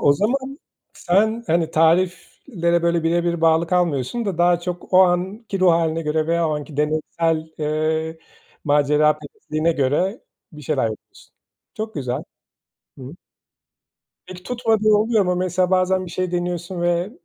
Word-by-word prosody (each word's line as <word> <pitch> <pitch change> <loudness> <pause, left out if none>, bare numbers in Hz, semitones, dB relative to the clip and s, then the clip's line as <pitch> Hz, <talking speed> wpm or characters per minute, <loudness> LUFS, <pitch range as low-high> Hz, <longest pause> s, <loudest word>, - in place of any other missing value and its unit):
O 140 - +5
zaman 265 - -2 0.3
sen 220 +6 0
hani 165 0 +1
tariflere 170 - +1
böyle 170 -1 +1
bire 170 +1 +1
bir 170 -1 -1
bağlı 165 0 +3
kalmıyorsun 175 - 0
da 190 -5 -3
daha 175 0 +3
çok 175 +1 -6
o 185 - +6
anki 190 +3 -1
ruh 185 -2 +5
hâline 165 -1 0
göreve 160 +2 0
o 155 -1 0
anki 150 0 -8
deneysel, 155 +1 -1
eee, 160 +1 -1 0.5
maceraperestliğine 150 +2 +1
göre 160 - 0 0.3
bir 150 -1 -11
şeyler 140 -1 -1
yapıyorsun. 110 - -13 0.4
Çok 220 0 -5
güzel. 130 -4 -3 0.8
Hı. 130 +2 -9 1.1
Peki 180 -1 -11
tutmadığı 225 -3 +1
oluyor 215 0 +3
mu 180 0 0
mesela 180 0 0
bazen 185 0 +2
bir 175 - -9
şey 185 0 -2
deniyorsun 175 0 -3
ve 175 +3 0
170 Hz, 140 wpm, -21 LUFS, 155-185 Hz, 1.1 s, o